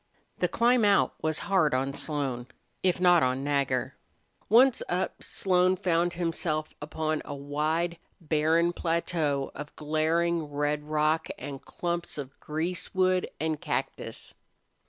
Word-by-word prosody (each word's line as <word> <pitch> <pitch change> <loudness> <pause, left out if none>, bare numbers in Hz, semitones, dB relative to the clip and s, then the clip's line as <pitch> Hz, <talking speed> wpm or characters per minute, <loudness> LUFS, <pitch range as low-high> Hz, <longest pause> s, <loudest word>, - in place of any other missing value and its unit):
The - - +2
climb 240 0 +3
out 200 -1 +4
was 155 0 0
hard 175 -9 +3
on 135 +2 0
Slone, 135 -5 -2 0.3
if 185 -1 +2
not 175 -2 +6
on 130 +1 +1
Nagger. 140 -2 0 0.5
Once 245 +4 +6
up, 180 +1 -2
Slone 185 -1 +2
found 175 -2 +1
himself 165 -2 -2
upon 155 +1 -2
a 145 - -6
wide, 155 +4 -1 0.2
barren 165 +1 +2
plateau 165 -5 -1
of 150 0 -8
glaring 160 +2 +1
red 145 0 -1
rock 155 +1 +1
and 135 0 -7
clumps 170 -2 -3
of 140 -2 -7
greasewood 180 +3 0
and 155 -1 -1
cactus. - - -4
160 Hz, 125 wpm, -28 LUFS, 145-175 Hz, 0.5 s, not